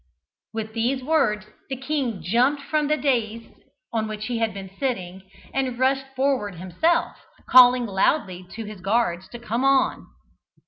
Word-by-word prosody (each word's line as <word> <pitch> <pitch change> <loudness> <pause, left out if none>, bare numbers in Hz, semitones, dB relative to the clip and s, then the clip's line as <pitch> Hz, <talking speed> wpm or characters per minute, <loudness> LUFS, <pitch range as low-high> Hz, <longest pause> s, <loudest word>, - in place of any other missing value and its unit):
With 220 -1 -5
these 250 +4 0
words 250 -8 +1 0.2
the 265 - -2
king 265 - -2
jumped 250 - +2
from 300 +1 0
the 305 +1 +2
dais 230 -5 0 0.5
on 220 -1 0
which 215 0 -5
he 240 -1 -2
had 225 -1 +1
been 195 -1 -8
sitting, 190 -8 -3 0.2
and 260 -2 -1
rushed 270 +1 +1
forward 260 -8 0
himself, 190 - 0 0.3
calling 250 -1 +7
loudly 190 - 0
to 225 - -6
his 210 -3 -9
guards 190 -3 0
to 240 - -8
come 235 +1 -2
on. 270 0 +2
235 Hz, 150 wpm, -24 LUFS, 210-270 Hz, 0.5 s, calling